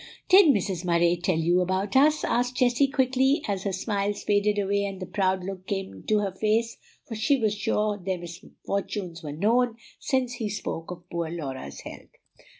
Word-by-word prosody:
"Did 380 -1 +8
Mrs. 195 - +1
Murray 170 0 +3
tell 175 0 0
you 175 +3 +2
about 185 +4 -1
us?" 300 +3 +4
asked 245 +1 0
Jessie 250 +2 +3
quickly, 265 +2 +2
as 195 -2 -2
her 200 - 0
smiles 200 +1 -2
faded 205 0 +2
away 200 0 +1
and 195 -1 -4
the 185 - -5
proud 190 -1 0
look 190 0 -7
came 195 - -3
into 155 - -1
her 200 -2 -1
face; 220 +4 0 0.3
for - - -6
she 240 +6 +2
was 215 -3 +1
sure 210 0 -1
their 190 0 -1
misfortunes 175 +1 -5
were 150 -3 -6
known, 225 +9 +1 0.2
since 260 -3 0
he 230 -4 -3
spoke 165 -5 -5
of 175 0 -9
poor 170 -1 -2
Laura's 135 - -6
health. - - -10
200 Hz, 180 wpm, -26 LUFS, 180-230 Hz, 0.3 s, Did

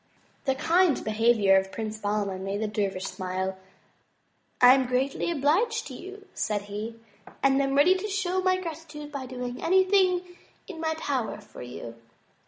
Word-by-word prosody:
The 265 -1 +2
kind 340 +2 +3
behavior 215 -3 +4
of 190 0 -1
Prince 220 -1 -5
Bahman 205 -2 -2
made 195 +1 -2
the - - 0
dervish 200 -3 -2
smile. 190 +1 -3 1.0
"I 250 0 +9
am 265 -1 +2
greatly 260 +6 0
obliged 340 - +1
to - - -8
you," 395 +2 -10
said 210 -2 -1
he, 210 +3 -6 0.5
and 275 0 +4
am 275 0 0
ready 290 +6 +6
to 380 +3 -3
show 380 -2 -1
my 370 0 +2
gratitude 310 -3 -7
by 275 -3 -5
doing 250 -1 -5
anything 375 0 +4 0.4
in 365 -6 -8
my 320 0 -1
power 265 -9 -2
for 210 0 -13
you." 120 -1 -8
265 Hz, 160 wpm, -27 LUFS, 210-345 Hz, 1.0 s, I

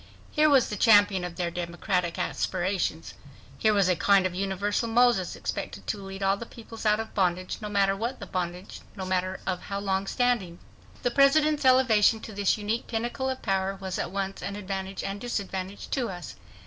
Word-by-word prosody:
Here 305 0 +4
was 275 -4 +4
the 210 - -3
champion 205 -3 +5
of 175 -1 -5
their 175 -1 -2
democratic 175 +1 -2
aspirations. 185 -3 -2 0.5
Here 220 - +4
was 200 -3 +3
a 180 - +3
kind 195 +1 +4
of 185 - -1
universal 195 +4 -1
Moses, 235 -5 +3
expected - - -5
to 210 - -2
lead 195 0 -7
all 195 +1 +2
peoples 225 -1 -7
out 210 0 +4
of 225 0 -5
bondage—no 185 +3 -1
matter 195 -1 +2
what 235 +6 -3
the - - -6
bondage, 180 0 -5
no 190 - -5
matter 185 0 -1
of 185 -1 -2
how 200 - -5
long 195 -1 -1
standing. 235 -9 0 0.5
The 245 - +1
President's 295 +2 +4
elevation 235 -4 +5
to 220 - -8
this 200 +1 +1
unique 215 +3 -2
pinnacle 240 +3 -2
of 260 0 -4
power 195 -1 0
was 190 -1 -5
at - - -2
once 195 +1 -3
an 200 - -4
advantage 195 -1 -4
and 195 +1 -3
a - - -14
disadvantage 195 -3 -4
to 250 -5 0
us. 175 -4 -7
200 Hz, 185 wpm, -27 LUFS, 185-225 Hz, 0.5 s, champion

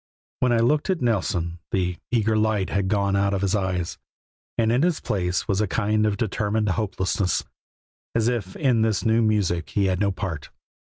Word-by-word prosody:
When 125 - +2
I 120 - +3
looked 145 +9 +2
at 185 -3 +1
Nelson 90 -7 0
the 90 -2 0
eager 110 -2 +2
light 110 -3 +1
had 100 -1 0
gone 100 -1 +1
out 100 0 +2
of 95 - -2
his 100 0 +1
eyes, 95 -4 -1 0.6
and 115 -1 +2
in 125 +5 +2
its 175 -3 +1
place 90 -2 -1
was 100 +1 +1
a 105 - +1
kind 110 +1 +1
of 100 -1 0
determined 105 0 0
hopelessness, 95 -1 0 0.7
as 115 -1 +2
if 110 -6 -2
in 125 -6 +2
this 110 -3 +1
new 110 +1 +3
music 100 -6 +1
he 100 -2 +1
had 95 -1 +1
no 100 -1 +2
part. 90 -6 -5
105 Hz, 185 wpm, -24 LUFS, 95-110 Hz, 0.7 s, I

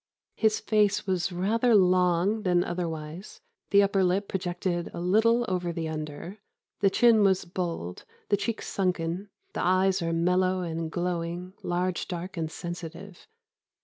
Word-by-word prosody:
His 220 -1 +2
face 210 -1 +2
was 185 -1 0
rather 220 +6 +2
long 185 +2 +3
than 180 -3 +2
otherwise; 170 0 -5 0.3
the 200 0 +6
upper 195 -1 +2
lip 190 +3 +1
projected 175 -1 -2
a - - -4
little 220 +7 +3
over 180 -2 -1
the 165 -1 -3
under; 155 +5 -6 0.4
the 200 - +4
chin 230 +2 +5
was 190 -2 +3
bold, 170 - -4 0.3
the - - +4
cheeks 225 +2 -3
sunken; 180 0 -1 0.2
the - - -2
eyes 185 +1 +3
are 165 0 -1
mellow 180 +2 +2
and 165 -2 -3
glowing, 175 +1 -3
large, 180 +1 -1
dark, 180 +1 -5
and 160 -2 -3
sensitive. 175 +2 -8
180 Hz, 145 wpm, -27 LUFS, 170-195 Hz, 0.4 s, the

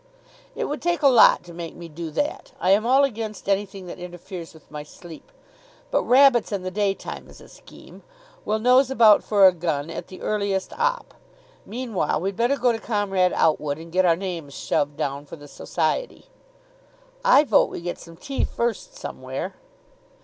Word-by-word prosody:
"It - - -2
would 295 - -4
take 345 -2 -1
a - - +7
lot 245 -9 +6
to 175 -1 -12
make 165 -1 -7
me 170 - -9
do 165 +1 -7
that. 290 - -3
I 185 - +2
am 215 +4 +3
all 265 +3 +5
against 220 -7 -3
anything 195 -1 -1
that 175 - -9
interferes 175 -1 -8
with 160 -3 -19
my 150 -1 -6
sleep. 160 +2 -13 0.6
But - - +2
rabbits 255 -3 +4
in 200 -3 -3
the 185 - -4
daytime 200 0 -3
is - - -15
a - - -15
scheme. - - -15 0.4
We'll 215 - 0
nose 250 +3 +4
about 225 -5 +5
for 205 -2 +4
a - - +6
gun 165 -3 -3
at - - -6
the 185 - -11
earliest 200 -2 -1
opp. - - -1 0.5
Meanwhile 225 -10 -2
we'd 195 +3 -3
better 240 +6 +1
go 245 -1 +3
up 230 - -2
to - - -15
Comrade 195 -4 0
Outwood, 150 -2 +1
and 165 +1 -11
get 185 +2 +2
our 170 -2 +4
names 170 -6 -6
shoved 145 0 -1
down 140 -1 -3
for - - -9
the 145 -2 -13
Society." - - -3 1.0
"I 485 -11 +6
vote 295 - +3
we - - -6
get 175 +1 -5
some 165 -1 -13
tea 275 - -3
first 240 - -3
somewhere." - - -6
195 Hz, 185 wpm, -23 LUFS, 170-240 Hz, 1.0 s, a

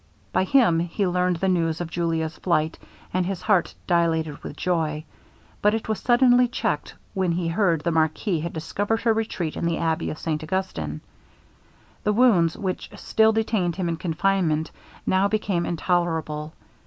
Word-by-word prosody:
By 185 - +2
him 210 -8 +4
he 175 +4 -1
learned 180 0 +1
the 190 +3 -1
news 165 -3 +1
of 170 -1 -4
Julia's 165 -2 -1
flight, 160 -3 0 0.3
and 185 0 +2
his 185 0 -4
heart 200 -5 +2
dilated 160 -4 +1
with 150 - -7
joy; 160 -4 -1 0.6
but 210 +1 +4
it 225 - -4
was 220 -3 -1
suddenly 245 +2 +5
checked 150 -10 -2 0.2
when 185 -3 0
he 170 0 -1
heard 170 -3 +2
the 170 - 0
marquis 160 +3 +1
had 170 +2 -4
discovered 205 +7 -2
her 230 -2 +3
retreat 215 -7 -2
in - - -4
the 170 - 0
abbey 160 -1 0
of 155 - -5
St 155 -1 -2
Augustin. 155 - -3 1.0
The 210 - +2
wounds 205 -9 +4
which 185 -2 -3
still 220 +1 +3
detained 215 -6 0
him 185 -2 -2
in 165 -1 -1
confinement, 165 -2 0 0.3
now 190 +1 +3
became 200 -4 -1
intolerable. 160 -3 -1
175 Hz, 165 wpm, -24 LUFS, 160-195 Hz, 1.0 s, suddenly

